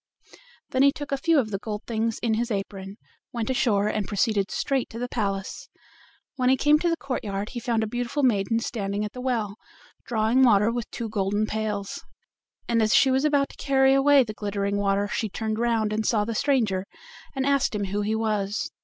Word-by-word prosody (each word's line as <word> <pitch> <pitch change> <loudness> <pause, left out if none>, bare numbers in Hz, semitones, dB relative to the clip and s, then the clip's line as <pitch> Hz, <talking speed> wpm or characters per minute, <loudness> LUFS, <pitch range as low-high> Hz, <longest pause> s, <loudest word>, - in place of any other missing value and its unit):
Then 260 - +1
he 280 +1 +6
took 290 0 -8
a - - +2
few 325 +4 +2
of 225 -6 +1
the 195 - -2
gold 210 0 -5
things 225 -1 -1
in 230 -2 +2
his 235 +2 -1
apron, 195 -1 -5 0.3
went 235 0 -2
ashore, 210 -6 +2
and 210 -2 -1
proceeded 205 -1 0
straight 270 -3 -1
to 230 - -9
the 245 +1 -3
palace. 195 -5 -3 0.7
When 255 -1 +2
he 265 - +4
came 295 +3 +4
to 345 - +1
the 330 - 0
courtyard 210 -8 -4
he 245 - -5
found 235 -2 0
a - - -2
beautiful 245 +5 -2
maiden 225 -1 +2
standing 205 -3 -3
at 210 - -7
the 250 - -7
well, 225 -5 -2 0.5
drawing 225 +2 +2
water 215 -3 +5
with 240 0 -4
two 235 -2 -5
golden 205 0 0
pails. 210 -2 -3 0.6
And 230 -1 +2
as 220 0 +3
she 270 -1 +5
was 265 +3 +2
about 285 -2 +2
to - - -15
carry 270 -1 +4
away 275 0 +5
the 215 -3 -6
glittering 200 -1 -2
water 200 0 +1
she 220 +1 -2
turned 220 +2 -3
round 225 -3 +1
and 220 +1 -1
saw 215 -1 +1
the 230 - -3
stranger, 215 -7 +1 0.5
and 265 0 -1
asked 275 -4 +1
him 205 - -1
who 200 +1 -2
he 215 +2 0
was. 215 +5 -1
220 Hz, 205 wpm, -25 LUFS, 205-255 Hz, 0.7 s, he